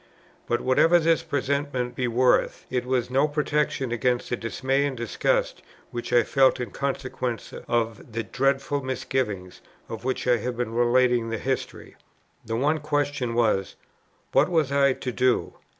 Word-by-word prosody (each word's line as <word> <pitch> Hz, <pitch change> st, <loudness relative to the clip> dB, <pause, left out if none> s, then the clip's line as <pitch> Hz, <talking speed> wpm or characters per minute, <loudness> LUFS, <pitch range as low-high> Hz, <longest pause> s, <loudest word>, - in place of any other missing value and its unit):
But, 120 Hz, -, 0 dB
whatever 160 Hz, +7 st, +4 dB
this 165 Hz, -1 st, +2 dB
presentiment 140 Hz, -3 st, -2 dB
be 125 Hz, 0 st, -1 dB
worth, 125 Hz, +2 st, +2 dB
it 125 Hz, -1 st, -1 dB
was 125 Hz, -1 st, 0 dB
no 135 Hz, +3 st, +3 dB
protection 145 Hz, -3 st, -1 dB
against 120 Hz, +1 st, 0 dB
the -, -, +2 dB
dismay 130 Hz, +4 st, -1 dB
and 135 Hz, -3 st, -5 dB
disgust, 120 Hz, -1 st, 0 dB, 0.3 s
which 120 Hz, 0 st, -5 dB
I 120 Hz, -1 st, +5 dB
felt, 135 Hz, +3 st, +3 dB
in 120 Hz, -5 st, -4 dB
consequence 130 Hz, -3 st, -3 dB
of 115 Hz, 0 st, -1 dB
the 115 Hz, 0 st, -2 dB
dreadful 135 Hz, +5 st, 0 dB
misgiving, 125 Hz, -7 st, -2 dB, 0.4 s
of 115 Hz, -, -7 dB
which 130 Hz, +1 st, -2 dB
I 125 Hz, -1 st, +4 dB
have 120 Hz, +2 st, -4 dB
been 120 Hz, -2 st, -2 dB
relating 120 Hz, 0 st, +3 dB
the 115 Hz, -, -2 dB
history. 130 Hz, +3 st, -4 dB, 0.5 s
The 115 Hz, -, -3 dB
one 150 Hz, +6 st, +1 dB
question 145 Hz, -5 st, -1 dB
was, 110 Hz, -5 st, +1 dB, 0.6 s
what -, -, +4 dB
was 160 Hz, -6 st, +1 dB
I 140 Hz, -1 st, +4 dB
to 130 Hz, -, -5 dB
do? 125 Hz, 0 st, +1 dB
125 Hz, 155 wpm, -25 LUFS, 120-140 Hz, 0.6 s, I